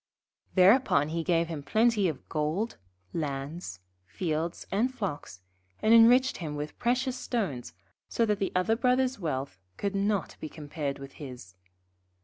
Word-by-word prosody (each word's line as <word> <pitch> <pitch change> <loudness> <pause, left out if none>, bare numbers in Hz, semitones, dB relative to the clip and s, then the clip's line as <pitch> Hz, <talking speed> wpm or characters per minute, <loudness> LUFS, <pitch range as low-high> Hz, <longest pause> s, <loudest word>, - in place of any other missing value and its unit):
Thereupon 185 - +5
he 165 +1 -2
gave 170 -1 +2
him 160 -3 -5
plenty 220 +5 +3
of 150 -6 -5
gold, 160 +9 -1 0.4
lands, 140 - -4 0.3
fields, 165 - -3
and 230 +6 +1
flocks, 160 - -5 0.4
and 220 - +4
enriched 245 +3 +6
him 155 -4 -5
with 150 +1 -6
precious 250 +2 +1
stones, 190 - -3 0.3
so 230 - +2
that 210 -2 0
the 195 - -1
other 185 +5 +3
Brother's 250 0 +2
wealth 135 - -3 0.2
could 200 -1 -2
not 200 -2 0
be 155 - -6
compared 145 -2 -4
with 135 -1 -9
his. 125 -9 -9
175 Hz, 140 wpm, -29 LUFS, 145-225 Hz, 0.4 s, enriched